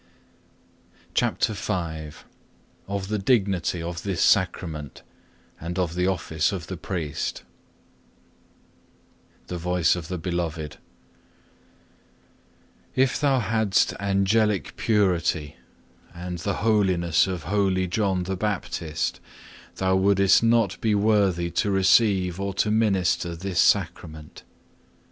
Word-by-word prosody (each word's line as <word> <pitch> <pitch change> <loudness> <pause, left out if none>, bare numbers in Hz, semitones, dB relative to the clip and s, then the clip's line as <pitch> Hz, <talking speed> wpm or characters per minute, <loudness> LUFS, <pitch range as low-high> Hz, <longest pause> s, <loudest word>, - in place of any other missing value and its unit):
CHAPTER - - +1
V 105 +1 -3 1.1
Of 100 -1 -3
the 105 -1 -1
dignity 95 -6 +1
of 85 0 -5
this 95 -3 -3
Sacrament, 80 -7 0 0.6
and 85 +2 -5
of 90 -3 0
the 90 +1 0
office 80 -4 0
of 90 -4 -5
the 95 - -6
priest 85 -4 -4 2.0
The 90 - -5
Voice 90 0 +2
of 85 -3 -6
the 90 - -4
Beloved 85 -3 -3 2.2
If 130 0 +2
thou 135 -3 +3
hadst 110 -3 +1
angelic 100 +1 +1
purity 85 -8 0 0.6
and 90 0 -6
the 100 +4 -2
holiness 95 -6 +3
of 90 -4 -4
holy 95 +1 +1
John 95 0 0
the 95 +2 -3
Baptist, 90 -6 -3 0.6
thou 95 0 +1
wouldest 100 0 +4
not 115 -4 +2
be 110 -2 +2
worthy 100 -5 +2
to 100 - 0
receive 95 -2 +3
or 100 -1 -3
to 105 - +1
minister 95 -5 +1
this 90 +1 -3
Sacrament. 80 -2 0
95 Hz, 110 wpm, -25 LUFS, 85-100 Hz, 2.2 s, wouldest